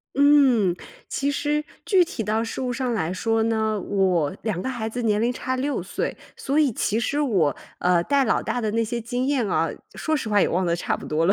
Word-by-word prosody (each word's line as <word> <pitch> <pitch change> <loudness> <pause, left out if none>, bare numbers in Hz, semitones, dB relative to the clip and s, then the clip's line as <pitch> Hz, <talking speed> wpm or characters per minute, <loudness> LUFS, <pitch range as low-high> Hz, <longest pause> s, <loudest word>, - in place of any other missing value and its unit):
嗯， 270 -10 +5 0.3
其 280 +1 -1
实 300 0 -1 0.2
具 370 -4 +5
体 265 - -5
到 220 +2 0
事 230 - -4
物 250 -1 -1
上 250 -1 -1
来 170 -4 -1
说 225 +3 0
呢， 220 -2 0
我 185 -4 +1
两 210 -6 -2
个 260 - -3
孩 230 -4 -3
子 245 +2 -4
年 215 -1 +1
龄 245 +1 +2
差 255 +1 -3
6 275 +3 -1
岁， - - -3 0.2
所 280 +3 -1
以 285 -6 +3
其 210 +1 0
实 285 +5 0
我， 185 - +2 0.2
呃， 175 -1 +3
带 275 +6 +2
老 - - +1
大 245 - -2
的 215 -2 -1
那 230 0 +1
些 235 +1 -3
经 245 +3 -2
验 260 -7 +1
啊， 165 -2 +1 0.2
说 315 -1 -1
实 230 -6 -4
话 205 -1 +3
也 - - +3
忘 180 +1 0
得 170 - +2
差 170 - -1
不 - - -10
多 160 +2 +1
了， 195 - +5
225 Hz, 245 characters per minute, -24 LUFS, 200-265 Hz, 0.3 s, 嗯